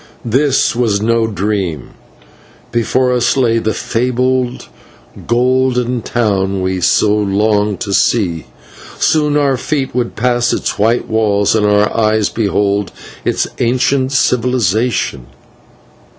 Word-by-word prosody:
This 135 +2 +1
was 115 -4 +1
no 115 +1 +1
dream: 95 - -3 0.8
before 125 +2 +1
us 125 +2 +1
lay 115 -3 +2
the 110 -1 -2
fabled 125 +1 -1 0.6
golden 125 0 +1
town 100 -5 -1
we 95 0 -1
had 90 -2 -4
so 105 0 +3
longed 105 0 0
to 100 -4 -3
see; 90 -7 +1 0.5
soon 150 -2 +1
our 140 -3 +1
feet 135 +1 -2
would 125 -1 -2
pass 120 0 +1
its - - -3
white 115 +4 +1
walls 105 -2 +1
and 105 -2 +2
our 105 0 +2
eyes 110 -2 +1
behold 100 -2 -1 0.3
its - - 0
ancient 130 +2 +1
civilisation. 120 - 0
115 Hz, 120 wpm, -15 LUFS, 105-125 Hz, 0.8 s, so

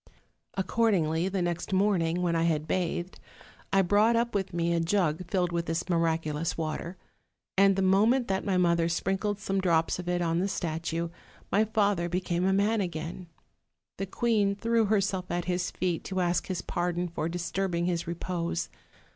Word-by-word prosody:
Ac 190 - 0
cordingly, 185 -6 +1
the 190 -2 0
next 175 +1 -2
morning, 180 -3 +2
when 170 -1 +1
I 165 - +2
had 160 -2 +1
bathed, 180 0 -2 0.5
I 195 0 +4
brought 210 +5 +4
up 235 0 +1
with 195 -2 -1
me 170 0 0
a 170 - +2
jug 170 -1 0
filled 180 -2 +1
with 170 0 -2
this 165 +2 -2
miraculous 165 -2 0
water; 165 +3 -4 0.6
and 195 0 +5
the 195 - +1
moment 220 +7 +3
that 190 0 -1
my 195 -3 +1
mother 170 -2 +3
sprinkled 195 +4 -1
some 195 -1 -1
drops 165 -2 +2
of 175 -1 -4
it 180 0 +1
on 165 -1 +1
the 190 - +1
statue, 170 -2 -2 0.4
my 210 +3 +4
father 200 -5 +1
became 180 0 -1
a 190 - +3
man 205 +3 +2
again. 170 0 -5 0.7
The 195 - -2
queen 205 -1 +1
threw 230 +2 +2
herself 195 -3 0
at 175 0 -2
his 180 -1 -1
feet, 180 -3 -2
to 190 -1 -2
ask 175 -1 +1
his 185 -2 -3
pardon 175 0 -1
for 165 -1 -3
disturbing 175 0 -1
his 175 -2 -1
repose. 170 0 -3
180 Hz, 175 wpm, -28 LUFS, 170-195 Hz, 0.7 s, and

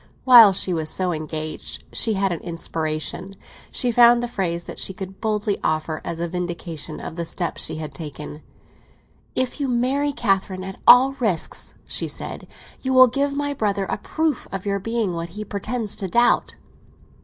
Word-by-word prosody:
While 235 -5 +9
she 185 -1 -1
was 160 -2 -1
so 180 0 +1
engaged 155 0 -5
she 225 - +3
had 195 -1 0
an 170 - -2
inspiration. 165 +2 -4 0.4
She 245 - +1
found 240 0 +6
the - - -1
phrase 175 -7 -2
that - - -9
she 190 - -3
could 190 0 -8
boldly 210 -2 -1
offer 155 0 -1
as 170 - -4
a 170 - -1
vindication 170 -3 -4
of 165 - -7
the 170 - -1
step 170 +1 -3
she - - -2
had 155 -2 -6
taken. 150 0 -7 0.9
"If 255 +3 -1
you 280 - 0
marry 260 +4 +1
Catherine 195 -6 0
at 190 0 -8
all 255 +2 +9
risks" 200 -10 -1
she - - -1
said, - - -5 0.3
"you 260 -1 -1
will 255 0 +10
give 280 +3 -1
my 285 0 -1
brother 200 -6 -1
a - - -2
proof 315 -4 -1
of 195 0 -5
your 200 0 0
being 225 -2 -1
what 170 0 -4
he 215 - -4
pretends 215 +2 -3
to 195 - -1
doubt." 240 +6 +2
195 Hz, 180 wpm, -22 LUFS, 170-240 Hz, 0.9 s, will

